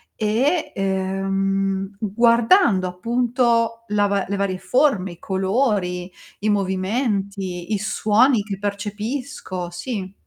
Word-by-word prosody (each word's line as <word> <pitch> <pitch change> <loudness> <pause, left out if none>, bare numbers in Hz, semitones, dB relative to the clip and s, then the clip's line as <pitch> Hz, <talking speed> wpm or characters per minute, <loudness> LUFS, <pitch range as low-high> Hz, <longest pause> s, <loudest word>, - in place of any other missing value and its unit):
e 265 +10 0
ehm, 195 0 -1
guardando, 230 - +4
appunto, 230 +3 0
la 205 -1 +2
va 200 -1 0
le 200 - -2
varie 195 -2 -1
forme, 215 -10 +1
i 170 - -17
colori, 190 -3 0 0.3
i 215 +1 0
movimenti, 195 -1 -1
i - - +2
suoni 220 +3 +3
che 200 -2 -5
percepisco, 205 -1 -4
sì. 190 +1 -5
200 Hz, 105 wpm, -22 LUFS, 190-230 Hz, 0.3 s, guardando